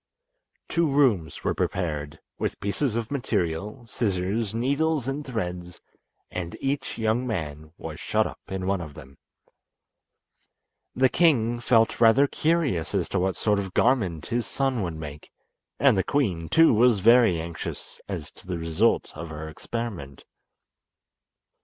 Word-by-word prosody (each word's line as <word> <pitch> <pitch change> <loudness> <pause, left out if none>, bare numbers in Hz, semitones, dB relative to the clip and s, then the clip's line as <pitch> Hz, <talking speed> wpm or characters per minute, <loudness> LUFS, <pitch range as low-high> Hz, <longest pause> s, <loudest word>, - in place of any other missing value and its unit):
Two 170 -2 +1
rooms 120 - +2
were - - +1
prepared, 75 -5 -2 0.2
with - - -2
pieces 110 +4 -1
of 115 +1 -3
material, 105 - -2
scissors, 100 -1 -1
needles 140 +4 0
and 140 +2 -2
threads, 90 -9 -5 0.5
and 85 -2 -5
each 135 +1 -2
young 115 +3 0
man 80 -7 -4
was - - -7
shut - - +1
up - - -7
in 95 -1 -4
one 95 -1 0
of 75 -4 -8
them. 65 +1 -13 1.8
The 130 +1 +5
king 120 -7 +3
felt 115 -1 +2
rather 115 +5 +6
curious 145 - 0
as 95 -4 +1
to 95 - 0
what 95 0 0
sort 105 -2 +1
of 95 -2 -5
garment 100 - +2
his 120 0 -2
son 135 -4 0
would 85 -4 -3
make, 75 -2 -8 0.5
and - - +5
the 95 - +2
queen, 95 - 0
too, 165 -4 +6
was 115 -1 +4
very 115 -5 +6
anxious 85 0 -7
as - - -5
to - - -17
the 90 -2 -2
result 80 -1 +1
of 85 - -7
her 80 0 -6
experiment. 85 - -6
105 Hz, 145 wpm, -26 LUFS, 85-125 Hz, 1.8 s, rather